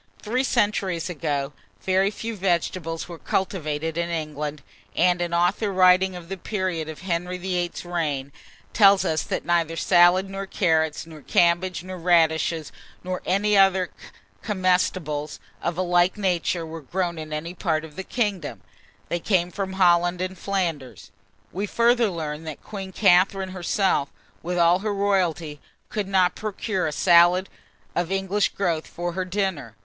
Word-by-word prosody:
Three 250 Hz, +5 st, 0 dB
centuries 200 Hz, -8 st, 0 dB
ago, 145 Hz, -3 st, -2 dB, 0.3 s
very 190 Hz, +1 st, +2 dB
few 225 Hz, +2 st, -5 dB
vegetables 175 Hz, -3 st, -1 dB
were 170 Hz, -2 st, -9 dB
cultivated 160 Hz, -4 st, -2 dB
in 170 Hz, 0 st, -1 dB
England, 150 Hz, -3 st, -4 dB, 0.3 s
and 180 Hz, 0 st, +3 dB
an 175 Hz, -1 st, -2 dB
author 175 Hz, +5 st, +1 dB
writing 185 Hz, 0 st, +4 dB
of 175 Hz, -2 st, -9 dB
the 195 Hz, +2 st, -5 dB
period 185 Hz, -5 st, -3 dB
of 155 Hz, -, -8 dB
Henry 180 Hz, 0 st, -2 dB
VIII.'s 180 Hz, -1 st, -3 dB
reign, 150 Hz, -6 st, -2 dB, 0.4 s
tells 200 Hz, -2 st, +5 dB
us 155 Hz, -1 st, +1 dB
that -, -, -4 dB
neither 170 Hz, -1 st, +1 dB
salad, 175 Hz, +2 st, +4 dB
nor 195 Hz, 0 st, -6 dB
carrots, 160 Hz, -5 st, +1 dB
nor 160 Hz, -2 st, -12 dB
cabbages, 175 Hz, +3 st, +2 dB
nor 185 Hz, 0 st, -7 dB
radishes, 165 Hz, -2 st, +2 dB, 0.3 s
nor 185 Hz, 0 st, -4 dB
any 205 Hz, +3 st, +2 dB
other 190 Hz, -2 st, +4 dB, 0.5 s
comestibles 180 Hz, -6 st, 0 dB, 0.2 s
of 170 Hz, 0 st, -2 dB
a 185 Hz, -, +1 dB
like 175 Hz, +2 st, +2 dB
nature, 180 Hz, -3 st, 0 dB
were 160 Hz, 0 st, -8 dB
grown 170 Hz, +3 st, -2 dB
in 155 Hz, 0 st, -7 dB
any 155 Hz, +3 st, -4 dB
part 160 Hz, -3 st, -1 dB
of 150 Hz, -2 st, -14 dB
the 190 Hz, -, -5 dB
kingdom: 205 Hz, -4 st, -2 dB, 0.5 s
they 175 Hz, -, -1 dB
came 180 Hz, -1 st, +1 dB
from 190 Hz, -1 st, -4 dB
Holland 175 Hz, -1 st, +3 dB
and 185 Hz, +1 st, -3 dB
Flanders. 170 Hz, -9 st, -3 dB, 0.4 s
We 200 Hz, +3 st, -3 dB
further 235 Hz, +1 st, +3 dB
learn, 155 Hz, -3 st, -5 dB
that 155 Hz, -3 st, -7 dB
Queen 195 Hz, -3 st, -7 dB
Catharine 190 Hz, 0 st, +3 dB
herself, 185 Hz, -4 st, 0 dB, 0.3 s
with 180 Hz, +2 st, -3 dB
all 170 Hz, +1 st, +4 dB
her 210 Hz, 0 st, -2 dB
royalty, 175 Hz, -7 st, 0 dB, 0.3 s
could 210 Hz, -3 st, -3 dB
not 185 Hz, -2 st, +3 dB
procure 205 Hz, -3 st, -2 dB
a -, -, -2 dB
salad 175 Hz, +3 st, +4 dB, 0.5 s
of 175 Hz, +1 st, -1 dB
English 195 Hz, +1 st, +1 dB
growth 170 Hz, -5 st, -1 dB
for 175 Hz, 0 st, -4 dB
her 185 Hz, +1 st, -3 dB
dinner. 180 Hz, -, -2 dB
180 Hz, 155 wpm, -24 LUFS, 165-190 Hz, 0.5 s, tells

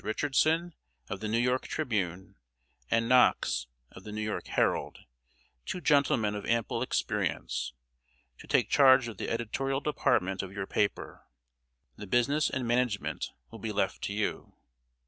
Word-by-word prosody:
Richardson, 155 Hz, +9 st, +1 dB, 0.4 s
of 95 Hz, -, -4 dB
The 110 Hz, -, -4 dB
New 110 Hz, +2 st, +1 dB
York 125 Hz, +2 st, +1 dB
Tribune, 95 Hz, -, -2 dB, 0.6 s
and 115 Hz, 0 st, +2 dB
Knox, 120 Hz, -, +3 dB, 0.2 s
of 95 Hz, -, -13 dB
The 105 Hz, -, -8 dB
New 105 Hz, 0 st, -3 dB
York 105 Hz, 0 st, -3 dB
Herald, -, -, 0 dB, 0.6 s
two 180 Hz, -, -4 dB
gentlemen 140 Hz, -8 st, +2 dB
of 105 Hz, -1 st, -5 dB
ample 115 Hz, -1 st, 0 dB
experience -, -, -2 dB, 0.7 s
to -, -, -13 dB
take -, -, +3 dB
charge 130 Hz, -3 st, +6 dB
of 110 Hz, -4 st, -7 dB
the -, -, -4 dB
editorial 135 Hz, +4 st, -1 dB
department 110 Hz, -10 st, +1 dB
of 95 Hz, -, -7 dB
your 95 Hz, 0 st, -4 dB
paper. 100 Hz, 0 st, -2 dB, 0.7 s
The 105 Hz, -, -8 dB
business 140 Hz, +8 st, +2 dB
and 130 Hz, -3 st, -3 dB
management 120 Hz, -3 st, 0 dB, 0.2 s
will 115 Hz, -, -10 dB
be 110 Hz, +1 st, -3 dB
left 100 Hz, -1 st, -1 dB
to 100 Hz, -, -3 dB
you." 105 Hz, 0 st, -3 dB
115 Hz, 145 wpm, -30 LUFS, 100-130 Hz, 0.7 s, charge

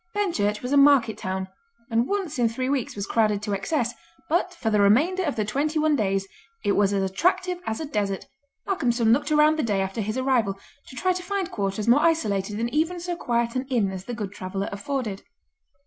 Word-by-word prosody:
Benchurch 215 Hz, -, 0 dB
was 250 Hz, -, -3 dB
a -, -, +5 dB
market 275 Hz, -6 st, +5 dB
town, 190 Hz, 0 st, -4 dB, 0.4 s
and 230 Hz, +2 st, +2 dB
once 375 Hz, -9 st, -2 dB
in 235 Hz, -2 st, +3 dB
three 255 Hz, +3 st, -3 dB
weeks 270 Hz, -4 st, -1 dB
was 200 Hz, -1 st, -3 dB
crowded 210 Hz, -1 st, +1 dB
to 205 Hz, -1 st, -2 dB
excess, 240 Hz, +5 st, -1 dB, 0.4 s
but 350 Hz, +3 st, +1 dB
for 230 Hz, -9 st, -2 dB
the 210 Hz, -1 st, +3 dB
remainder 295 Hz, -, +4 dB
of 295 Hz, -5 st, -1 dB
the 215 Hz, -, -1 dB
twenty 290 Hz, +8 st, -1 dB
one 310 Hz, -1 st, +3 dB
days 195 Hz, -4 st, 0 dB, 0.4 s
it 205 Hz, -, +2 dB
was 200 Hz, 0 st, +3 dB
as 195 Hz, -1 st, +1 dB
attractive 360 Hz, -, 0 dB
as 220 Hz, -, -2 dB
a 315 Hz, -, -3 dB
desert. 205 Hz, -8 st, -2 dB, 0.4 s
Malcolmson 240 Hz, -, +2 dB
looked 290 Hz, +4 st, 0 dB
around 305 Hz, +1 st, +4 dB
the -, -, +3 dB
day 210 Hz, -6 st, 0 dB
after 195 Hz, +3 st, -2 dB
his 215 Hz, +4 st, -3 dB
arrival 245 Hz, -7 st, +1 dB, 0.3 s
to -, -, -11 dB
try 370 Hz, +6 st, +1 dB
to 365 Hz, -, -4 dB
find 385 Hz, 0 st, -3 dB
quarters 200 Hz, -, -2 dB
more 245 Hz, +5 st, +5 dB
isolated 210 Hz, -, +1 dB
than 230 Hz, +2 st, 0 dB
even 330 Hz, +4 st, +1 dB
so 350 Hz, 0 st, -3 dB
quiet 235 Hz, -6 st, -1 dB
an 255 Hz, +1 st, -2 dB
inn 225 Hz, -7 st, +1 dB
as 190 Hz, 0 st, -7 dB
"The 240 Hz, -, -5 dB
Good 205 Hz, -4 st, -4 dB
Traveller" 195 Hz, 0 st, -4 dB
afforded. 210 Hz, 0 st, -3 dB
235 Hz, 210 wpm, -25 LUFS, 205-300 Hz, 0.4 s, a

